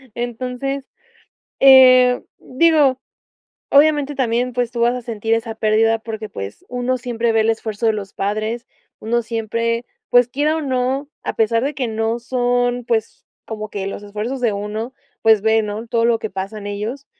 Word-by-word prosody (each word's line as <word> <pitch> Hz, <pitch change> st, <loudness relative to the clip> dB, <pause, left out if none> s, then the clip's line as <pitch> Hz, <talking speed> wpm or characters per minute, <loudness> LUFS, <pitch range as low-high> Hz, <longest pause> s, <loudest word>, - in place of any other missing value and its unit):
Entonces, 250 Hz, +3 st, -4 dB, 0.7 s
eh, 255 Hz, -2 st, +7 dB, 0.2 s
digo, 285 Hz, -2 st, +3 dB, 0.7 s
obviamente, 290 Hz, 0 st, +4 dB
también, 245 Hz, -1 st, 0 dB
pues, 245 Hz, -1 st, -1 dB
tú 235 Hz, -, -4 dB
vas 240 Hz, +1 st, +3 dB
a 250 Hz, -, -6 dB
sentir 225 Hz, -1 st, -3 dB
esa 225 Hz, 0 st, -3 dB
pérdida 220 Hz, +1 st, +2 dB
porque, 220 Hz, -1 st, -6 dB
pues, 100 Hz, -, -8 dB
uno 250 Hz, +1 st, -1 dB
siempre 235 Hz, -1 st, -1 dB
ve 225 Hz, -, +3 dB
el 225 Hz, -, +2 dB
esfuerzo 220 Hz, 0 st, -3 dB
de 220 Hz, -, +4 dB
los 200 Hz, -2 st, -6 dB
padres, 215 Hz, +4 st, -3 dB, 0.3 s
uno 235 Hz, +2 st, -1 dB
siempre, 230 Hz, +1 st, -2 dB, 0.2 s
pues, 245 Hz, -1 st, +5 dB
quiera 295 Hz, +5 st, 0 dB
o -, -, -2 dB
no, 265 Hz, 0 st, -1 dB
a -, -, -3 dB
pesar 230 Hz, +1 st, +2 dB
de 285 Hz, +1 st, -2 dB
que 260 Hz, -3 st, -2 dB
no 225 Hz, +1 st, -1 dB
son, 245 Hz, 0 st, 0 dB
pues, 225 Hz, -2 st, -2 dB, 0.2 s
como 215 Hz, -1 st, -6 dB
que 195 Hz, -2 st, -4 dB
los 200 Hz, -, -5 dB
esfuerzos 210 Hz, +6 st, -5 dB
de 235 Hz, -3 st, +1 dB
uno, 210 Hz, +4 st, -4 dB, 0.3 s
pues, 220 Hz, -2 st, +5 dB
ve, 220 Hz, +1 st, +3 dB
¿no?, 210 Hz, +2 st, -5 dB
todo 230 Hz, 0 st, 0 dB
lo 235 Hz, -1 st, +3 dB
que 220 Hz, -, -5 dB
pasan 200 Hz, +2 st, -6 dB
ellos, 215 Hz, +7 st, -5 dB
235 Hz, 170 wpm, -19 LUFS, 220-250 Hz, 0.7 s, eh